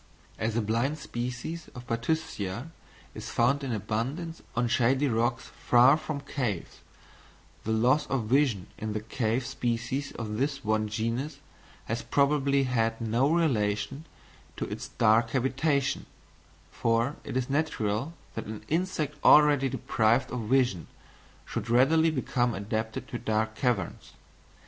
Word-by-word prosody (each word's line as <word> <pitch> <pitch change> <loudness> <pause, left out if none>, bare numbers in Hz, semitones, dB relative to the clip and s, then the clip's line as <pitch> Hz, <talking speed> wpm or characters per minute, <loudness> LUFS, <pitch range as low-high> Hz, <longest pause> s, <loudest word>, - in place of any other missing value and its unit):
As 110 0 -1
a 115 - +1
blind 120 +8 0
species 125 +5 -5
of 125 0 -8
Bathyscia 115 - -2 0.4
is - - -7
found 140 +5 +2
in 135 - -2
abundance 120 - -3
on 120 0 +1
shady 130 +4 +2
rocks 120 0 0
far 125 +4 +5
from 155 -2 -4
caves, 125 -10 -3 0.9
the 110 - -1
loss 125 +7 +3
of 135 -4 0
vision 120 -5 +2
in 110 0 -3
the 110 - -1
cave 115 +2 -1
species 120 +4 -2
of 105 -2 -4
this 140 0 -1
one 110 0 +1
genus 115 +7 -2 0.5
has 115 +2 -2
probably 140 -1 +2
had 115 -3 0
no 115 +5 +1
relation 135 -3 0 0.5
to - - -2
its - - -6
dark 115 +2 +3
habitation; 135 +3 0 0.6
for 115 +5 +1
it - - -3
is 130 -1 -1
natural 140 -2 -1 0.2
that 115 - -5
an 105 0 -7
insect 160 -3 -1
already 145 -3 +6
deprived 115 +1 +1
of 115 -3 -4
vision 125 -10 +2 0.6
should 115 - -4
readily 155 +7 +5
become 125 -5 0
adapted 110 +2 -3
to 120 - -5
dark 110 0 0
caverns. 120 -2 -2
120 Hz, 135 wpm, -28 LUFS, 110-140 Hz, 0.9 s, already